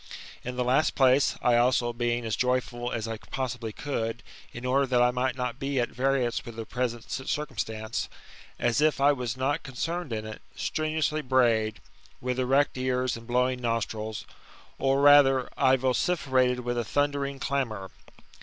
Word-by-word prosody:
In 125 0 -5
the 125 - 0
last 130 +5 +2
place, 130 +1 +4
I 120 -1 +4
also, 120 0 +2
being 120 0 -1
as 110 - -1
joyful 125 -1 -1
as 115 -1 -3
I 115 0 -4
possibly 125 -4 -4
could, 115 -2 -3 0.3
in 120 +1 -8
order 135 +2 +2
that 125 -1 +2
I 125 - +4
might 125 +1 -1
not 125 -1 -3
be 135 -1 -1
at 120 - 0
variance 130 -2 0
with 115 - -9
the 115 0 -5
present 120 -1 -3
circum 135 -2 -3
stance, 110 +1 -3 0.5
as 120 +3 +1
if 155 -2 +3
I 140 +1 +5
was 125 -3 -3
not 135 +3 0
oncerned 165 +3 -3
in 110 -1 -3
it, 110 -1 -8
strenuously 155 -1 -1
brayed, 120 -5 +2 0.4
with 125 0 -2
erect 130 +1 +2
ears 130 -1 0
and 115 0 -11
blowing 125 +1 +1
nostrils, 110 -2 -2 0.5
or 135 +1 +2
rather, 140 -3 +6
I 130 0 +4
vociferated 130 -1 +1
with 120 0 -2
a - - 0
thundering 140 +3 -1
clamour. 120 -9 -2
125 Hz, 165 wpm, -27 LUFS, 120-135 Hz, 0.5 s, rather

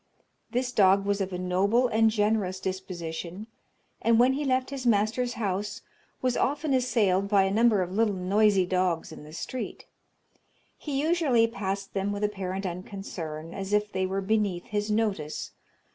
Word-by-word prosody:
This 250 +1 -1
dog 195 -3 +4
was 200 0 0
of 190 0 -2
a 180 - -3
noble 195 +7 +2
and 225 -1 +3
generous 210 -3 0
disposition, 185 0 -5 0.6
and 230 0 +4
when 250 +3 +5
he 290 +2 -2
left 260 0 +1
his 275 -2 -4
master's 230 +2 +1
house 205 -3 -3 0.4
was 255 -1 +2
often 290 +1 0
assailed 215 -7 +2
by 200 -2 +5
a 195 - 0
number 215 -2 +4
of 180 - -6
little 210 0 +1
noisy 195 +1 +3
dogs 180 -3 0
in 155 - -10
the 150 - -12
street. 245 +10 -6 0.9
He 280 -3 -2
usually 305 -8 +3
passed 195 -3 -4
them 195 +1 -1
with 205 +1 -3
apparent 195 -2 -2
unconcern, 170 -3 -6
as 195 +1 -4
if 210 0 +1
they 190 0 0
were 195 +1 -2
beneath 200 -3 0
his 210 -2 -2
notice. 210 -8 -1
205 Hz, 160 wpm, -27 LUFS, 185-230 Hz, 0.9 s, when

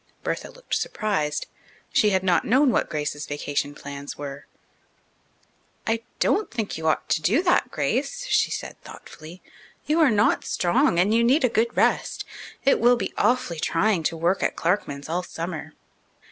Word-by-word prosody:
Bertha - - -3
looked - - -10
surprised. 200 - -1 0.5
She 210 - +4
had 190 -2 +1
not 180 -3 +3
known 260 +4 +4
what - - 0
Grace's 150 -1 -3
vacation 145 0 -3
plans 140 0 -8
were. 140 -1 -7 1.4
"I 225 0 0 0.2
don't 425 - +2
think 225 -4 -3
you 160 0 -3
ought 155 - +1
to - - +1
do 220 - +2
that, 355 - +2
Grace," - - -2
she - - +2
said - - -6
thoughtfully. 160 +4 -12 0.4
"You 310 +2 +1
are 310 -4 +6
not 210 0 +2
strong, 175 -1 +2
and 190 +5 +3
you 230 +1 +4
need 265 +5 +3
a 250 - +4
good 230 +1 0
rest. - - +1 0.4
It 275 - +4
will 245 +1 +5
be 235 - -4
awfully 240 -10 +1
trying 180 +4 +1
to 165 - 0
work 175 +4 +1
at - - 0
Clarkman's 165 -6 -1
all 170 +3 -1
summer." 170 -2 -6
185 Hz, 165 wpm, -24 LUFS, 155-235 Hz, 1.4 s, are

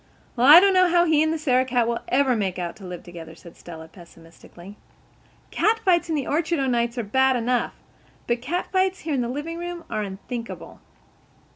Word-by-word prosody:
"Well, 250 +1 +2
I 305 +4 +11
don't 395 +1 +3
know 370 -1 +4
how 345 0 +3
he 315 -3 +3
and 315 0 +1
the 325 - -1
Sarah 255 -4 +1
cat 245 -3 0
will 235 0 -1
ever 260 -1 +2
make 195 -4 -2
out 175 -2 -5
to 200 - -12
live 180 -1 -8
together," 165 -2 -11
said 170 0 -15
Stella 160 -2 -11
pesimistically. 170 +2 -16 0.8
"Cat 445 +1 +1
fights 345 -2 +2
in 320 - 0
the 280 -4 -2
orchard 325 +2 -1
o'nights 240 -3 -1
are 240 - -2
bad 265 +5 +2
enough. 245 0 -1 0.5
But 235 0 -2
cat 340 +9 -3
fights 375 0 0
here 315 -2 -4
in 265 - 0
the 235 - -3
livingroom 335 +5 -6
are 215 - -2
unthinkable." 210 +4 -8
255 Hz, 195 wpm, -23 LUFS, 205-325 Hz, 0.8 s, I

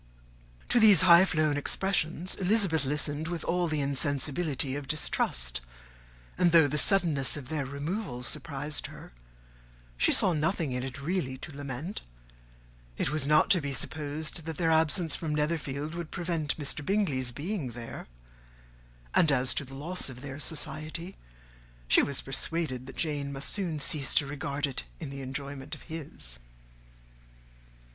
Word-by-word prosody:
'" - - -27
To 245 - +4
these 210 -6 +7
high 175 0 +8
flown 155 -4 +1
expressions 175 +2 0
Elizabeth 190 -6 +2
listened 150 +2 -1
with 170 -1 -4
all 175 0 0
the 155 -2 -1
insensibility 140 0 +1
of 145 -1 -5
distrust; 60 - 0 0.8
and 175 -2 +4
though 165 -3 +7
the 150 +2 +2
suddenness 160 -9 +4
of 135 -3 -8
their 150 -4 -2
removal 140 - -4
surprised 145 +2 -1
her, - - -12 0.9
she - - +3
saw 185 - +5
nothing 160 -1 0
in 125 0 -2
it 135 +1 -6
really 155 -6 -1
to 150 +2 -9
lament: 145 +6 -5 1.0
it - - -1
was 150 -2 0
not 150 +1 +4
to 180 - +5
be 140 -1 -3
supposed 150 +4 -3
that 160 - -4
their 165 -2 +2
absence 160 +1 +3
from 155 -3 -2
Netherfield 150 -1 -2
would 170 -2 -5
prevent 165 -4 -1
Mr. 150 -1 -2
Bingley's 145 -10 0
being 145 - -4
there; 115 -1 -8 1.1
and 160 - +4
as 130 -1 +2
to - - -1
the 135 0 -11
loss 165 +4 -2
of 125 -1 -10
their 140 0 -7
society, 155 +4 -3 0.7
she - - +6
was 140 -2 +2
persuaded 135 -2 -1
that 135 - -10
Jane 145 -3 -1
must 135 0 -3
soon 175 -7 -1
cease 140 -1 0
to 145 - +4
regard 145 0 -2
it 135 -2 -4 0.2
in 150 -5 -6
the 140 0 -7
enjoyment 140 +2 -5
of - - -15
his. 140 - -8
150 Hz, 155 wpm, -29 LUFS, 135-165 Hz, 1.1 s, high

